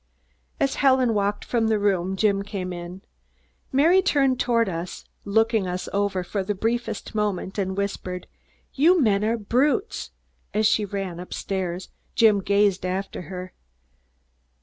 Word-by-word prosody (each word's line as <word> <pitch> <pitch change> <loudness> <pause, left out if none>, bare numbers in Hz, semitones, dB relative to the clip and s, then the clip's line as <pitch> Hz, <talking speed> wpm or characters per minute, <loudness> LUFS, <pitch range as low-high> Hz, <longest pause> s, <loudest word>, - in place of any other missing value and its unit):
As 275 - +1
Helen 260 -4 +4
walked 205 0 0
from 230 -2 +1
the 220 -1 +2
room, 190 -2 +1
Jim 200 0 +2
came 195 -3 -4
in. 175 +2 -8 0.7
Mary 325 +8 +5
turned 275 -8 +2
toward 230 -3 +2
us, 170 -1 -5 0.2
looked 225 +3 +2
us 185 -4 -1
over 200 -2 0
for 195 +2 -3
the 205 +2 -2
briefest 235 +5 -2
moment 205 -2 -2
and 190 0 -2
whispered, 190 -2 -3 0.5
"You 340 +6 +5
men 210 -7 +3
are 225 +2 +1
brutes!" 275 - 0 0.5
As 215 +1 +2
she 210 0 +3
ran 195 -3 -4
up 180 - -7
stairs, 185 -2 -3 0.3
Jim 215 -4 +5
gazed 200 -1 +2
after 185 +1 -3
her. 185 -1 -7
205 Hz, 145 wpm, -24 LUFS, 190-230 Hz, 0.7 s, Mary